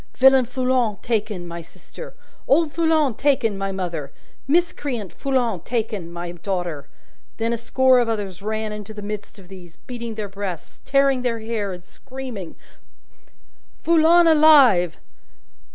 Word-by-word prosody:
Villain 265 -1 +6
Foulon 250 -3 0
taken, 210 -6 -2
my 170 0 -7
sister! - - -12 0.3
Old 300 +1 +3
Foulon 320 -5 +2
taken, 240 -4 +1
my 195 0 -3
mother! 175 -7 -4 0.4
Miscreant 280 - -1
Foulon 250 -8 -1
taken, 215 -7 -3
my 175 0 -6
daughter! 175 -5 -4 0.5
Then, 230 +1 -1
a - - -1
score 260 +2 +3
of 240 -1 +1
others 200 -4 -4
ran 215 +1 -3
into 210 0 -8
the 210 - -7
midst 210 0 -6
of 190 -3 -15
these, 175 -3 -13
beating 235 -2 -7
their 215 -2 -4
breasts, 195 -4 -7
tearing 275 -2 +3
their 235 -2 -2
hair, 220 -3 -3
and 180 -1 -8
screaming, 250 -4 -9 1.3
Foulon 335 +1 +5
alive! 285 - +6
225 Hz, 135 wpm, -22 LUFS, 195-265 Hz, 1.3 s, Villain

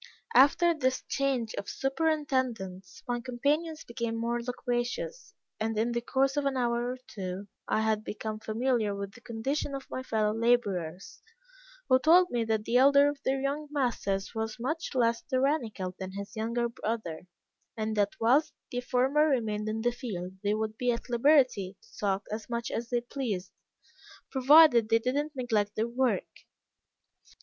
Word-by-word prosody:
After 315 +6 +6
this 260 -4 0
change 265 -5 0
of 200 - -6
superintendents, 260 - -1
my 245 0 -1
companions 295 +6 -1
became 235 -1 -3
more 235 +1 -1
loquacious, 250 - -3 0.2
and 220 0 -1
in 230 +2 +1
the 235 0 -1
course 265 +3 +1
of 290 -1 0
an 275 -1 0
hour 240 0 0
or - - -9
two, 190 0 -6 0.2
I 220 - +1
had 220 -1 +1
become 215 0 -5
familiar 220 -1 0
with 200 0 -5
the 235 - -16
condition 260 +5 -3
of 270 - -7
my 255 - -3
fellow 215 -4 0
laborers, 200 -7 0 0.7
who 255 0 +5
told 350 +6 +5
me 240 -1 +1
that 220 -1 0
the 240 - +2
elder 280 +2 +6
of 290 -1 -6
their 270 +1 +1
young 285 +3 -2
masters 235 -9 -1
was 220 0 -3
much 310 +4 -3
less 235 -2 +2
tyrannical 255 - -1
than 190 0 -6
his 200 0 -7
younger 235 +2 -1
brother; 215 -8 -4 0.5
and 215 0 -2
that 205 -1 +1
whilst 255 +7 +3 0.2
the 245 - -2
former 265 +5 +2
remained 215 -6 0
in 220 +1 -2
the 240 +1 +2
field 195 -8 -5
they 205 +1 +1
would 220 0 -3
be 250 -1 +2
at 235 +1 -5
liberty 240 -7 +3
to - - -20
talk 200 -1 0
as 215 +2 -5
much 235 -1 -3
as 230 +1 -3
they 240 -1 +1
pleased, 225 -8 -4 0.8
provided 265 -4 +6
they 225 - +5
did 250 +3 -1
not 295 +1 -2
neglect 220 -5 0
their 220 +2 0
work. 250 +1 0
235 Hz, 165 wpm, -29 LUFS, 215-265 Hz, 0.8 s, After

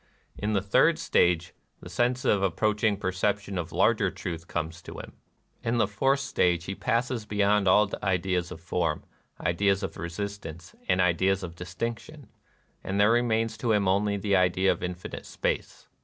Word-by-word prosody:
In 105 +1 -2
the 100 -2 +1
third 100 - +4
stage 85 -1 +2 0.3
the - - -11
sense 125 +1 0
of 100 - +3
the 100 - +4
approaching 105 +3 +1
perception 100 +1 -1
of 85 -1 -5
larger - - +3
truth 85 -1 -6
comes 85 0 -4
to - - -10
him. - - -9 0.5
In 115 +1 0
the 115 - +4
fourth 135 +7 +1
stage 90 -10 +1
he 95 - -4
passes 115 +1 -1
beyond 105 -1 +2
all 105 +3 +5
ideas 90 -2 0
of 90 - -8
form, 85 -2 -1 0.4
ideas 100 +3 +1
of 95 - -4
resistance, 85 -1 -6 0.2
and 90 0 +3
ideas 95 +2 +2
of 85 -2 -6
distinction; 90 +7 -6 0.5
and 100 +1 -2
there 105 +2 +5
remains 115 -2 +1
to 115 -1 +1
him 100 -2 +2
only 100 +2 +2
the 100 0 +1
idea 95 +1 +3
of - - -3
infinite 90 0 -6
space. - - -3
95 Hz, 170 wpm, -27 LUFS, 90-105 Hz, 0.5 s, all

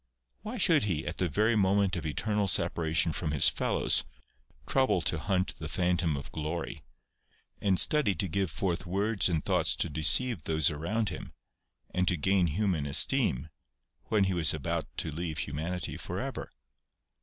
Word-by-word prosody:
Why 220 +4 -6
should 165 - +3
he, 90 -7 -2
at - - -5
the 90 - +1
very 110 +9 +2
moment 100 -1 +2
of 85 -3 -4
eternal 105 +6 -1
separation 80 -2 +1
from 80 - -3
his 75 -2 +4
fellows, - - +1 0.6
trouble 130 - +2
to 85 +1 0
hunt 95 +3 -1
the 80 - -5
phantom 90 -4 0
of 70 - -8
glory, 80 +2 -4 0.8
and 95 -3 +2
study 145 -11 +3
to 95 - -2
give 95 +2 -1
forth 90 +2 -3
words 100 +3 +1
and 80 -3 -1
thoughts - - +2
to - - -1
deceive 80 - +2
those 80 0 +2
around 100 +9 -2
him, - - -8 0.6
and 90 0 0
to 90 - +2
gain 95 +2 +2
human 85 -3 -1
esteem, 70 0 +2 0.6
when 105 -2 +2
he 95 -1 0
was 80 -3 +2
about 70 - -3
to 80 - -2
leave 80 0 -4
humanity 80 +5 -4
for - - -5
ever - - -5
90 Hz, 165 wpm, -29 LUFS, 80-100 Hz, 0.8 s, his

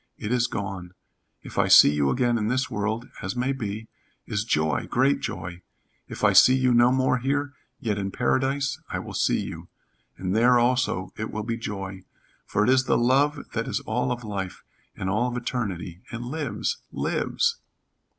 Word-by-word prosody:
It 105 - -4
is 125 -1 +2
gone. 95 -6 -5 0.5
If - - -5
I - - +3
see - - +8
you 70 -2 +2
again 120 -2 +1
in 105 - -1
this 130 +3 0
world 110 +3 -2
as 95 - -4
may 125 +2 0
be 110 -4 -4 0.4
is 100 - -2
joy 80 -8 0
great 135 +3 +2
joy. 85 +1 -5 0.5
If - - -8
I - - +5
see 130 - +7
you 130 -1 +3
no 120 +1 +5
more 130 -1 +2
here, 145 +3 -1 0.3
yet 105 -3 -1
in 100 -1 -2
Paradise 135 +7 0
I - - -2
will - - -7
see - - +1
you, - - -7 0.5
and 95 +1 -2
there 120 +2 +5
also 120 -6 +1
it 110 - -3
will 110 - -4
be 115 +1 -2
joy, 95 -4 -6 0.5
for 105 - +1
it 110 - +2
is 130 0 +4
the - - +2
love 140 +4 +2
that 115 0 -2
is - - -1
all 125 +3 -1
of 120 0 -3
life, 100 -4 -5 0.3
and 95 - -4
all 110 +6 +1
of 125 - -4
eternity, 95 -8 -4
and 120 0 -5
lives 150 +4 -3
lives!" 470 0 0
120 Hz, 185 wpm, -25 LUFS, 100-130 Hz, 0.5 s, see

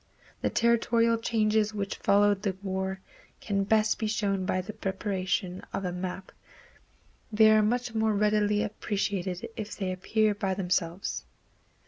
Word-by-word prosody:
The - - +1
territorial 230 0 +2
changes 215 -2 +1
which 200 -1 -3
followed 205 0 +3
the 195 -3 -1
war 190 0 -3 0.4
can 200 -2 -1
best 215 +1 +2
be 220 - -1
shown 200 -3 0
by 185 - +1
the 190 +4 -5
preparation 190 -2 -2
of 195 - -2
a 180 - -1
map. 185 +1 -5 1.0
They 215 0 +6
are 215 0 +6
much 240 +2 0
more 220 -1 +1
readily 210 0 +2
appreciated 195 -3 -2
if 215 -2 -5
they 190 -2 -2
appear 215 +3 +1
by 195 -2 -2
themselves. 180 -1 -2
205 Hz, 140 wpm, -28 LUFS, 190-215 Hz, 1.0 s, They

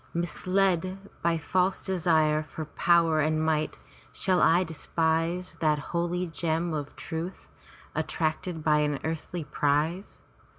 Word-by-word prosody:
Misled 185 +1 +1 0.2
by 170 0 +2
false 185 +4 +1
desire 160 -5 +2
for 155 +1 -7
power 165 0 +3
and 155 +1 +2
might, 155 -1 0 0.3
shall 185 -2 +1
I 175 +3 +5
despise 165 +2 -1
that 155 -2 +3 0.2
holy 175 +1 0
gem 165 0 -1
of 145 -2 -4
truth, 165 +3 -6 0.4
attracted 160 0 -2
by 150 -1 +4
an 150 -1 +1
earthly 165 +1 -3
prize? 150 +6 -1
165 Hz, 120 wpm, -28 LUFS, 155-175 Hz, 0.4 s, I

